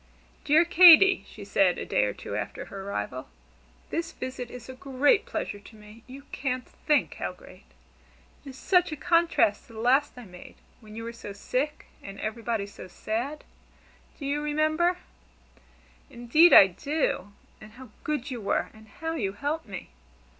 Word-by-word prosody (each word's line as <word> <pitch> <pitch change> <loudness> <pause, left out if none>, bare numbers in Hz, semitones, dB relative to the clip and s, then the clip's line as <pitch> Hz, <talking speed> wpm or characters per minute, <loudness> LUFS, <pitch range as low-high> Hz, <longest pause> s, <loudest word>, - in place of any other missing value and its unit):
"Dear 315 +4 +5
Katy," 360 +2 +7
she 205 -2 -11
said 195 -3 +2
a - - -5
day - - +1
or 105 - -1
two 100 - -7
after 105 0 -5
her 195 - -9
arrival, 130 - -5 0.6
"this 330 0 -3
visit 255 -1 -6
is 245 -2 -10
a 260 - -8
great 275 - +1
pleasure 205 - -4
to 205 +2 -16
me 210 +1 -15
you 270 +2 -11
can't 255 -2 -3
think 300 -1 0
how - - -3
great. - - -17 0.8
It 285 - -10
is 260 - -11
such 360 0 +2
a - - -3
contrast 335 -10 +1
to 230 - -16
the 220 - -9
last 265 +4 +2
I 245 - -10
made, 180 -2 -13 0.2
when 215 -2 -14
you 225 - -6
were 230 0 -6
so 220 -3 -9
sick, 265 +9 -3 0.2
and 195 0 -10
everybody 225 -1 -3
so 200 -2 -11
sad. 240 +10 -4 0.7
Do 285 - -8
you 285 +2 -1
remember?" 310 +4 +1 1.1
"Indeed 275 +7 +4
I - - +10
do! 205 - -3 0.3
And 215 0 -13
how 255 0 -13
good 290 -3 -3
you 245 -3 -5
were, 200 - -1
and 220 0 -17
how 325 +10 -5
you 200 -11 -2
helped 290 +6 -4
me! 195 -3 -9
250 Hz, 175 wpm, -27 LUFS, 210-300 Hz, 1.1 s, I